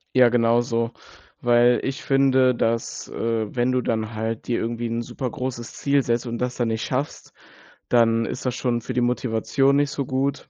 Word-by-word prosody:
Ja, 125 -2 +7
genau 115 0 +3
so, 115 -1 -1 0.5
weil 120 0 +4
ich 135 - -3
finde, 130 -2 +3
dass, 115 0 -2
äh, 115 -2 -2
wenn 125 0 +1
du 125 0 +1
dann 110 -1 -2
halt 110 +1 -3
dir 120 - 0
irgendwie 115 +1 -3
'n 115 +1 -2
super 125 +2 -4
großes 125 -5 -5
Ziel 140 0 +1
setzt 120 -1 -1
und 120 -1 -4
das 125 0 -2
dann 120 -2 0
nicht 110 0 -2
schaffst, 135 +4 -4 0.6
dann 115 -1 +3
ist 125 +2 -5
das 125 -1 -1
schon 120 -2 -1
für 125 +2 -5
die 125 - +1
Motivation 125 +2 +1
nicht 145 0 +2
so 140 -2 -3
gut. 135 +2 -2
120 Hz, 195 wpm, -23 LUFS, 115-130 Hz, 0.6 s, Ja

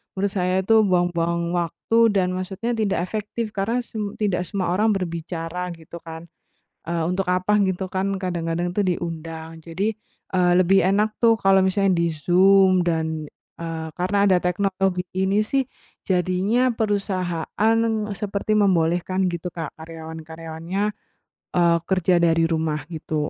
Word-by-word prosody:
menurut 195 +1 0
saya 185 -1 0
itu 225 +3 +5
buang-buang 170 -2 +1
waktu 175 +6 -1 0.2
dan 185 -2 +2
maksudnya 190 +5 -3
tidak 215 -6 0
efektif 215 +3 -4
karena 220 +5 -1
sem 210 -3 -5
tidak 185 -4 -1
semua 185 -4 -2
orang 210 +3 +2
berbicara, 170 -1 -4
gitu 165 +1 -11
kan. 165 0 -10 0.6
Eee, 170 -1 0
untuk 180 +2 -1
apa 185 +3 +1
gitu 190 -1 0
kan, 190 +1 0
kadang-kadang 175 -1 -2
tuh 205 - +1
diundang, 165 -3 -4
jadi, 185 +7 -2 0.4
eee, 180 -1 +3
lebih 185 +1 +4
enak 205 +4 +2
tuh 230 -1 +5
kalau 195 -2 +4
misalnya 190 0 +2
di 170 -1 +1
Zoom 185 +4 +4
dan, 160 -3 -1 0.3
eee, 165 -1 -4
karena 200 +4 +1
ada 185 -3 +4
teknologi 185 0 0
ini 190 +3 +1
sih, 270 +5 +1 0.4
jadinya 190 +7 +1
perusahaan 200 -1 0 0.4
seperti 210 +1 -1
membolehkan, 185 -1 +2
gitu, 175 +1 -5
Kak, 165 -1 -6
karyawan-karyawannya, 160 +2 -6 0.7
eee, 170 -1 +4
kerja 185 -1 +2
dari 165 -1 +3
rumah, 160 -3 -1
gitu. 155 -2 -3
180 Hz, 135 wpm, -23 LUFS, 170-195 Hz, 0.7 s, itu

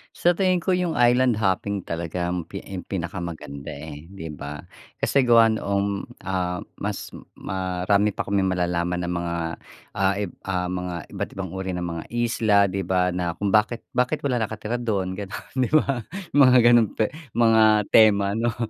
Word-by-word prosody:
Sa 175 - +3
tingin 185 -1 +1
ko 190 - +1
yung 180 -2 0
island 125 0 +4
hopping 100 -1 -1
talaga 85 +1 -3
ampi 90 -2 -5 0.2
pinakamaganda, 85 -6 -5
eh, 75 +2 -9
'di 80 -5 -8
ba? 75 0 -7 0.3
Kasi 135 -3 +1
gawa 115 -1 +6
noong, 100 -2 -1 0.2
ah, 90 -2 -2 0.2
mas - - -4 0.2
marami 95 +2 0
pa - - -2
kaming 100 -1 +1
malalaman 90 -1 -1
ng 85 - -2
mga, 85 -1 -2 0.6
ah, 95 0 +1
i 105 - -2 0.2
ah, 90 -1 -1
mga 90 -2 -5
iba't - - -4
ibang 95 -3 -5
uri 95 -1 -4
ng 90 - -3
mga 85 -2 -4
isla, 110 -3 +3
'di 95 -1 -3
ba, 90 -1 +2
na 90 -1 -2
kung 100 +2 -1
bakit 110 +2 +2
bakit 125 +4 0
walang 125 -3 +1
nakatira 110 +2 -3
dun 95 -5 -2
gano'n, 100 -2 -7
'di 130 -2 0
ba, 140 -4 +2 0.3
mga 130 -3 +6
ganun 120 -2 +6
te 110 +1 0 0.2
mga 110 -2 +5
tema, 100 -3 +5
'no, 115 +1 -1
100 Hz, 165 wpm, -24 LUFS, 90-115 Hz, 0.6 s, gawa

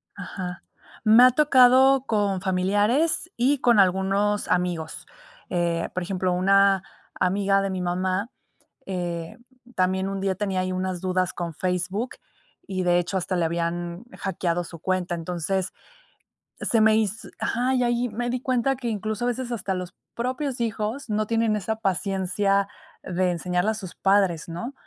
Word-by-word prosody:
Ajá, 180 -2 -6 0.4
me 225 +3 +7
ha 255 - +8
tocado 265 -1 +5
con 200 -4 0
familiares 205 - +1
y 265 +3 +2
con 235 -5 +4
algunos 195 +2 +2
amigos, 175 -3 -1 0.4
eh, 170 -1 0
por 185 - -2
ejemplo, 185 -1 -1
una 195 +1 +4 0.4
amiga 195 +1 +2
de 195 - -1
mi 185 -1 -3
mamá, 185 +4 -1 0.6
eh, 175 -2 -4 0.4
también 190 +1 +1
un 195 0 -3
día 195 -1 0
tenía 190 -1 -1
ahí 185 0 -2
unas 185 -1 -2
dudas 185 -1 0
con 170 -1 -4
Facebook 185 +7 -2 0.5
y 190 -1 -2
de 175 0 +3
hecho 175 +2 -2
hasta 185 0 -1
le 170 - +1
habían 170 +3 -2
hackeado 175 -3 -1
su 170 - -10
cuenta, 185 -1 -1
entonces, 180 +3 -2 0.9
se 230 - +2
me 215 0 +5
hiz 220 -1 -1
ajá, 250 +3 0
y 250 - +2
ahí 240 +1 +1
me 240 +3 -3
di 250 0 -1
cuenta 255 +1 +1
que 245 -2 -5
incluso 215 +1 -2
a - - +1
veces 245 0 -2
hasta 200 -4 -2
los 180 -1 -5 0.2
propios 255 +1 -3
hijos 225 +3 -3
no 215 0 0
tienen 225 -2 +1
esa 220 +3 -2
paciencia 195 +1 0 0.3
de 180 0 0
enseñarle 180 +4 0
a - - -1
sus 195 -5 -7
padres, 195 -5 +2
¿no? 230 +11 -5
195 Hz, 155 wpm, -25 LUFS, 180-225 Hz, 0.9 s, ha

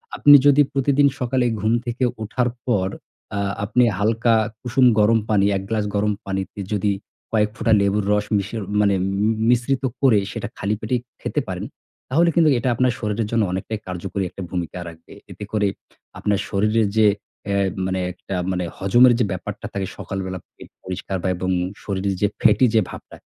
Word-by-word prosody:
আপনি 145 0 +8
যদি 145 0 +6
প্রতিদিন 140 +1 +3
সকালে 125 0 0 0.2
ঘুম 110 +2 +2
থেকে 120 +2 -2 0.2
উঠার 125 +3 0 0.2
পর, 100 -7 +1 0.5
আ - - -1 0.2
আপনি 115 +4 +2 0.2
হালকা 115 +2 +2 0.3
কুসুম 125 +1 +2
গরম 115 +2 +4
পানি, 100 -2 +3
১ 95 - -4
গ্লাস 110 -2 0
গরম 105 +1 +1
পানিতে, 95 +1 -4
যদি 100 0 +1 0.4
কয়েক 105 -1 +2
ফোঁটা 115 - +1
লেবুর 100 +1 +1
রস 105 0 +2
মিশিয়ে 105 +3 -3 0.2
মানে 100 -1 +3 0.3
ম 105 - +3 0.2
মিশ্রিত 125 +2 +1 0.2
করে, 125 -7 +5
সেটা - - -4
খালি 100 +2 -1
পেটেই 120 +3 -1 0.2
খেতে - - -1
পারেন, - - -4 0.4
তাহলে 165 +6 +3
কিন্তু, 165 -3 +5
এটা 120 +2 -2
আপনার 125 0 +2
শরীরের 105 0 -2
জন্য 115 -2 +2
অনেকটাই 95 +4 -3
কার্যকরী 95 +2 -4
একটা 95 - -10
ভূমিকা 90 -1 -4
রাখবে। 80 -1 -12 0.2
এতে 105 - -8
করে 105 -2 +1 0.5
আপনার 105 -1 0
শরীরের 105 +2 +2
যে, 110 - +6 0.5
এ - - +1 0.3
মানে 95 0 -1
একটা 95 +2 -7 0.2
মানে 90 -1 -1
হজমের 120 +6 +5
যে 120 - +3
ব্যাপারটা 100 +3 -6
থাকে 95 -1 -2
সকাল 95 - -5
বেলা, 95 0 -5 0.2
পেট - - -13
পরিষ্কার 95 +1 -5
বা - - 0
এবং 95 0 -2 0.3
শরীর 100 -1 -2
যে 105 - +4
ফ্যাটি 105 +5 +5
যে 110 - +6
ভাবটা, - - -11
105 Hz, 175 wpm, -22 LUFS, 100-120 Hz, 0.5 s, আপনি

